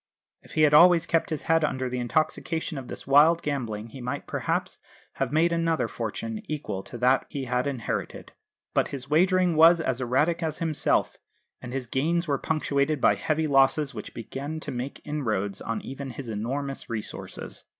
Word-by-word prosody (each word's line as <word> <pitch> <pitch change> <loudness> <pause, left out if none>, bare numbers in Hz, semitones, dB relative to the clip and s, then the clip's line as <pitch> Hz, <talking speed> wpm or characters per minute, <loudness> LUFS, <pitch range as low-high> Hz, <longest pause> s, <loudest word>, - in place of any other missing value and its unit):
If - - -15
he 155 - +3
had 150 -1 +5
always 170 +2 +7
kept 165 -1 +1
his 155 -2 -3
head 165 0 +2
under 130 -3 -1
the 125 0 -3
intoxication 155 +3 -1
of 130 - -9
this - - -8
wild 150 +5 +5
gambling 115 -7 -3
he 130 +3 -10
might 125 +4 -4
perhaps - - -2 0.4
have - - -1
made 165 +3 +3
another 165 -1 +1
fortune 210 - -4
equal 125 -11 -4
to 120 - -8
that 125 +2 +2
he 140 -2 -4
had 125 +2 0
inherited. 130 -5 -4 0.4
But - - +2
his 140 0 -7
wagering 180 +1 +3
was 165 +2 +7
as 130 -5 -1
erratic 150 +8 +1
as 160 -2 -2
himself, 160 -3 0 0.4
and 125 - -7
his 130 -1 -3
gains 165 +8 0
were 140 -2 0
punctuated 150 -1 0
by - - +5
heavy 155 0 -1
losses 135 0 +3
which 105 -3 -8
began 140 +7 -5
to - - -5
make 125 +2 -5
inroads 110 -10 -2
on 115 - -3
even 135 +1 -6
his 125 -1 -7
enormous 135 +6 -4
resources. 110 -2 -6
140 Hz, 180 wpm, -26 LUFS, 125-160 Hz, 0.4 s, always